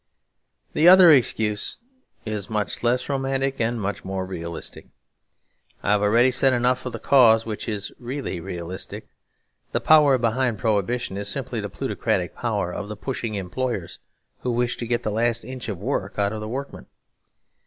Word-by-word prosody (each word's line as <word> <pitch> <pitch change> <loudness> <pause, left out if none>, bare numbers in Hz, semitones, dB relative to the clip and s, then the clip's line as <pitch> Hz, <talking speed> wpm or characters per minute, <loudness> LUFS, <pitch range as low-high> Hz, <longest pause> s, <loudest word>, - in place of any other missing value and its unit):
The 160 - +4
other 180 -2 +9
excuse 110 -6 +2 0.5
is 105 -2 -4
much 105 -2 -2
less 125 +1 +1
romantic 135 -1 -1
and 115 +1 0
much 100 -1 -3
more 95 0 -3
realistic. 85 -3 -7 1.0
I 100 - +1
have 105 -1 +3
already 115 +5 +4
said 130 +1 +3
enough 125 +1 +1
of 125 - -5
the - - -3
cause 115 -5 +5
which 110 +1 -4
is 105 -2 -3
really 125 -6 -4
realistic. 85 +2 -6 0.7
The - - +2
real - - -20
power 150 -4 +6
behind 120 0 0
Prohibition 105 0 -1
is 100 - -4
simply - - -4
the - - -5
plutocratic - - -2
power 90 - -2
of 105 - -5
the 105 - -7
pushing 120 -5 -4
employers 100 -1 -3 0.4
who 125 - -3
wish 120 0 0
to 120 - -4
get 120 0 0
the 105 - -1
last 115 +2 +1
inch 130 -2 -6
of 100 - -3
work 100 -1 -3
out 100 0 +1
of 110 - -4
their 110 - -5
workmen. 140 +4 -6
115 Hz, 170 wpm, -24 LUFS, 105-130 Hz, 1.0 s, other